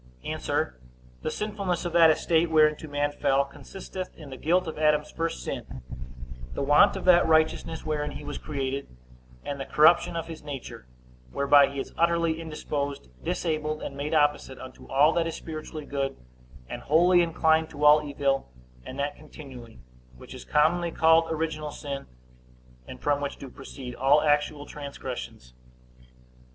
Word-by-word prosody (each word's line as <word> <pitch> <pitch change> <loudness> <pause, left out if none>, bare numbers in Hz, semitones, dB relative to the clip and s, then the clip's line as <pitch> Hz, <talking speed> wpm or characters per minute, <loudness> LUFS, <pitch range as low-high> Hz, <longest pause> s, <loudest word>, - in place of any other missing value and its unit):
A. - - -3 0.9
The - - -2
sinfulness 200 -5 -3
of 175 - -3
that 165 -1 +7
estate 165 +1 +2
whereinto 155 0 +3
man 145 0 -1
fell, 140 -1 +1
consisteth 185 +6 -8
in 150 -4 -11
the - - -6
guilt 175 +6 +2
of 160 - -6
Adam's 150 -1 +2
first 165 0 -3
sin, 65 - -6 0.7
the - - -2
want 145 +1 +5
of - - -5
that 175 -2 +6
righteousness 160 0 +1
wherein 150 -1 -1
he - - -8
was 145 - -6
created, 140 -2 -3 0.6
and 140 -1 -4
the 135 - -4
corruption 165 +3 +4
of 165 -1 -3
his 165 -1 -9
nature, 135 - -8 0.4
whereby 140 - +5
he 140 0 -6
is - - -6
utterly 170 -1 +2
indisposed, 145 - -4
disabled, 155 - -2
and 140 - -6
made 145 +3 -2
opposite 145 -3 +1
unto 130 0 -11
all 145 +4 +4
that 170 -1 +1
is 165 - -4
spiritually 155 -1 -7
good, 135 -1 -3 0.5
and - - -6
wholly 175 +4 +4
inclined 160 -1 +2
to 150 0 -3
all 150 +1 +8
evil, 140 - -1 0.3
and 130 - -8
that 140 +1 -2
continually; 135 -6 -12 0.4
which - - -12
is - - -9
commonly 170 +3 +2
called 165 0 +4
original 155 -1 -2
sin, 140 -2 -6 0.8
and - - -10
from 145 -1 +1
which 140 - -4
do 135 -2 -10
proceed 130 -2 -9
all 135 +4 +3
actual 145 -1 +1
transgressions. 130 - -8
150 Hz, 160 wpm, -27 LUFS, 140-160 Hz, 0.9 s, all